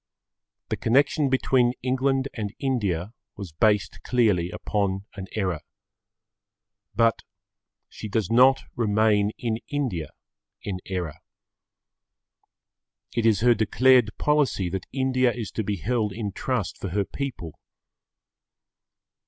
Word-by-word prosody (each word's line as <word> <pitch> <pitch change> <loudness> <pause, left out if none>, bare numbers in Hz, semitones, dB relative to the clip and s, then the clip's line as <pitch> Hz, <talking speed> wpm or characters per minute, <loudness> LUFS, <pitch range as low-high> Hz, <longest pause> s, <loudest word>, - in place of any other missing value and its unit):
The - - -1
connection 140 +4 +2
between 130 -2 +2
England 135 +1 +1
and 105 -3 -5
India 105 - -1 0.2
was 100 -5 -8
based 100 +1 +1
clearly 105 -9 +2
upon 95 0 -2
an 95 -1 -7
error. 95 -7 -1 1.3
But 115 -1 +3 0.7
she 110 - -8
does 105 -2 -1
not 130 +3 +5
remain 105 -2 +2
in 115 -2 -2
India 120 - -2 0.5
in 95 -3 -4
error. 85 -5 -4 2.0
It 115 -1 +2
is 110 -2 +3
her 120 0 +6
declared 120 +1 +3
policy 145 -11 +1
that 95 0 -4
India 130 -2 +2
is 115 -4 -5
to 110 - -2
be 105 0 -1
held 105 +2 -1
in 105 -1 -4
trust 115 0 -3
for 95 - -4
her 100 +3 0
people. 125 - -5
110 Hz, 115 wpm, -25 LUFS, 95-125 Hz, 2.0 s, her